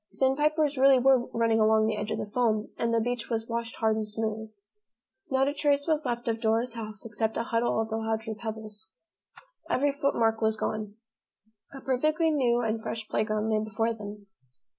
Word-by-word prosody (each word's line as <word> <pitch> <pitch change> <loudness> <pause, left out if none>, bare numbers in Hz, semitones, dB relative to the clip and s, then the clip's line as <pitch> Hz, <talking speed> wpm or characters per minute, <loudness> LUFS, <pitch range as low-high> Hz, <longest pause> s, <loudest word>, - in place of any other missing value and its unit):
Sandpipers 295 +1 +1
really 270 0 +7
were 255 -1 +4
running 230 -1 +1
along 220 0 +4
the 220 0 0
edge 210 0 -4
of 220 - -1
the - - -3
foam 215 0 0
and 230 - -1
the 230 - +3
beach 240 0 -2
was 225 -1 -2
washed 235 0 -3
hard 220 -1 +1
and 215 -1 -2
smooth. 220 0 -3 0.8
Not 265 0 +2
a 285 - 0
trace 285 -1 +1
was 310 -3 0
left 240 0 -3
of 225 -1 -1
Dora's 230 +2 +1
house 215 -3 -6
except 220 0 -2
a - - 0
huddle 230 -1 0
of 220 0 -1
the 220 - -2
larger 220 0 -2
pebbles. 220 -1 -7 0.8
Every 285 +2 +2
footmark 235 -6 +1
was 220 0 +1
gone. 215 -1 -3 0.8
A 270 - -9
perfectly 310 +5 +1
new 245 -5 +2
and 225 -1 -1
fresh 220 -1 -5
playground 215 0 0
lay 215 - +2
before 225 +2 -1
them. 205 -1 -9
225 Hz, 185 wpm, -28 LUFS, 220-255 Hz, 0.8 s, really